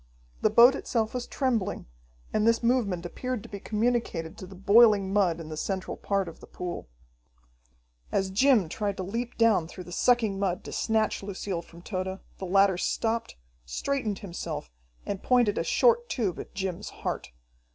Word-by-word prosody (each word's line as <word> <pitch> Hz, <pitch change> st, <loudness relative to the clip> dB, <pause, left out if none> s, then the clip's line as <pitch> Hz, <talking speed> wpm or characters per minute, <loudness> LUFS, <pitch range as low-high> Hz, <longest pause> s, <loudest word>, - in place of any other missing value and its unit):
The -, -, +4 dB
boat 235 Hz, +4 st, +8 dB
itself 225 Hz, -5 st, -1 dB
was 250 Hz, -1 st, -3 dB
trembling, 235 Hz, -8 st, -1 dB, 0.5 s
and 215 Hz, +1 st, +2 dB
this 230 Hz, +1 st, +3 dB
movement 215 Hz, -8 st, +1 dB
appeared 250 Hz, +5 st, -4 dB
to -, -, -11 dB
be 200 Hz, -, -6 dB
communicated 210 Hz, -7 st, -1 dB
to 185 Hz, -, -8 dB
the 190 Hz, -, -11 dB
boiling 200 Hz, 0 st, +5 dB
mud 185 Hz, -5 st, +2 dB
in 160 Hz, -1 st, -8 dB
the 155 Hz, -, -5 dB
central 190 Hz, +4 st, -3 dB
part 195 Hz, -2 st, -1 dB
of 165 Hz, -, -9 dB
the -, -, -13 dB
pool. 175 Hz, -, -6 dB, 1.2 s
As 190 Hz, -1 st, 0 dB
Jim 225 Hz, -2 st, +4 dB
tried 200 Hz, +4 st, -2 dB
to 190 Hz, -, -3 dB
leap 230 Hz, +6 st, -4 dB
down 220 Hz, -8 st, +4 dB
through 180 Hz, +2 st, -9 dB
the 175 Hz, -, -11 dB
sucking 220 Hz, -1 st, +2 dB
mud 185 Hz, -2 st, -1 dB
to -, -, -8 dB
snatch 220 Hz, -1 st, 0 dB
Lucille 195 Hz, -2 st, -4 dB
from 170 Hz, 0 st, -15 dB
Tode, 190 Hz, -1 st, -3 dB, 0.2 s
the 190 Hz, -, -4 dB
latter 195 Hz, 0 st, +4 dB
stopped, 225 Hz, -, -1 dB, 0.3 s
straightened 220 Hz, -, -2 dB
himself, 170 Hz, -, -5 dB, 0.3 s
and 200 Hz, -1 st, -3 dB
pointed 240 Hz, -5 st, +3 dB
a -, -, 0 dB
short 485 Hz, -1 st, +3 dB
tube 205 Hz, -9 st, -1 dB
at -, -, -9 dB
Jim's 190 Hz, -3 st, -3 dB
heart. -, -, -5 dB
200 Hz, 170 wpm, -28 LUFS, 185-230 Hz, 1.2 s, boat